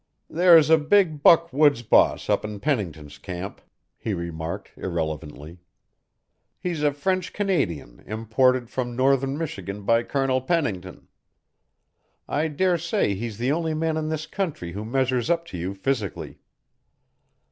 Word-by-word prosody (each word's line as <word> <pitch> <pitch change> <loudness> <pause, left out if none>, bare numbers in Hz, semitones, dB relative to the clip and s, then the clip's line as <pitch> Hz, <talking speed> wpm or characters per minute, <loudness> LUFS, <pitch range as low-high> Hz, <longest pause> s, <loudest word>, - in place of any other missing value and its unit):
"There's 165 -2 +6
a 160 - +7
big 155 -1 +2
buck 165 0 +5
woods 145 -4 +4
boss - - +3
up - - +1
in 105 -1 -6
Pennington's 80 - -3
camp," 90 +3 -7 0.4
he 105 - -2
remarked 85 -1 -5
irrelevantly. 80 -1 -5 1.0
"He's 175 -4 -3
a 150 -1 +3
French 185 +5 -2
Canadian 105 - -2
imported 120 +3 +1
from 120 0 -4
northern 135 +1 +2
Michigan 100 - -5
by 115 +3 +3
Colonel 130 +1 0
Pennington. 110 - -2 1.2
I 155 +2 0
dare 175 +3 +1
say 170 - 0
he's 110 +1 -5
the 125 +3 0
only 160 0 -1
man 160 0 0
in 155 0 -2
this 155 -1 -3
country 160 - -4
who 100 +4 -5
measures 130 +2 0
up 170 -1 +1
to - - -4
you 95 +3 -4
physically. 105 -1 -3
130 Hz, 135 wpm, -24 LUFS, 100-155 Hz, 1.2 s, a